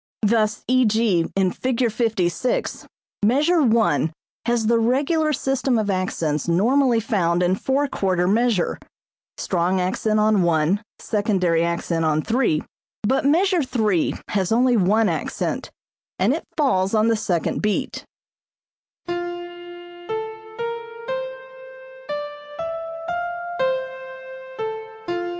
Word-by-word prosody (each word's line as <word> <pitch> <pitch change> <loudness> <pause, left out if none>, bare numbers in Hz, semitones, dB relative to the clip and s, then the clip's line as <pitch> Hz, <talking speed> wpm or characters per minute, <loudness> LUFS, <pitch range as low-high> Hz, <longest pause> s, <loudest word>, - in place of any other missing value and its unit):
Thus 215 0 +2
e.g., 220 -8 +2
in 190 -2 +2
Fig. 250 0 0
56, 215 -1 -1 0.4
measure 300 +10 +4
one 220 - +3 0.4
has 235 -2 +1
the 230 +1 +3
regular 285 +7 +2
system 270 -2 0
of 210 -2 0
accents 165 -5 -1
normally 235 +8 +3
found 180 -6 +1
in 180 +1 +3
four 270 +8 0
quarter 185 -7 0
measure, 220 -2 +1 0.6
(strong 180 +1 0
accent 215 +4 0
on 215 -2 +4
one, 170 +3 +2 0.2
secondary 190 -6 +1
accent 170 -1 -1
on 155 -1 +1
three); 225 -10 +1 0.4
but 265 +6 +1
measure 360 +4 +3
three 220 - +1
has 195 -2 0
only 245 +2 +4
one 215 +2 +3
accent, - - -2 0.5
and - - +3
it - - -4
falls 195 -9 +2
on 215 +1 +3
the 230 - +3
second 180 -6 -1
beat. 210 -1 -1
215 Hz, 95 wpm, -22 LUFS, 180-245 Hz, 0.6 s, measure